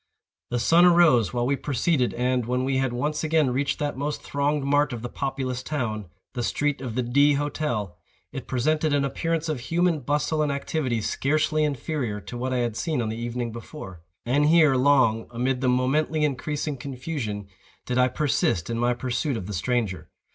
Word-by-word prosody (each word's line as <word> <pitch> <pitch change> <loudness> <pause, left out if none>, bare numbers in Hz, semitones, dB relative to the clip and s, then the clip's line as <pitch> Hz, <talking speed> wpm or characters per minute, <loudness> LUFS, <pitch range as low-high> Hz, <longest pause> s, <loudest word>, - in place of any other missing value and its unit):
The 120 - -1
sun 165 +8 +5
arose 165 - +5
while 120 0 -1
we 140 +2 +2
proceeded, 140 -1 0
and, 125 -1 0
when 125 +1 0
we 135 0 +1
had 130 -1 +1
once 150 +6 -2
again 155 -4 +2
reached 135 +2 0
that 145 -1 -2
most 150 +1 -3
thronged 145 0 0
mart 145 0 +2
of 115 -1 -6
the 120 - -4
populous 135 -2 -3
town, 110 - -3 0.3
the 125 - -3
street 145 +3 -1
of 125 -4 -5
the 125 - 0
D—— 140 +5 +4
Hotel, 140 - -2 0.4
it - - -7
presented 155 +4 +1
an 140 -1 +2
appearance 165 +3 -1
of 155 -5 -2
human 165 +5 +1
bustle 145 +3 0
and 150 -1 +1
activity 140 -4 -1
scarcely 155 +6 +1
inferior 140 -6 -2
to 120 - -9
what 130 +2 -2
I 130 - 0
had 115 -2 -4
seen 155 +2 -1
on 115 -2 -1
the 110 - -4
evening 120 0 -3
before. 110 - -9 0.2
And 140 +5 +2
here, 155 -3 +5
long, 130 -4 +3
amid 125 +2 -1
the 130 - +2
momently 150 +5 +1
increasing 145 +1 -2
confusion, 125 -6 -5 0.4
did 125 0 0
I 125 - +5
persist 125 - 0
in 115 - -2
my 120 +1 +2
pursuit 130 +2 -2
of 95 - -6
the 105 - -5
stranger. 110 0 -1
130 Hz, 190 wpm, -25 LUFS, 120-150 Hz, 0.4 s, sun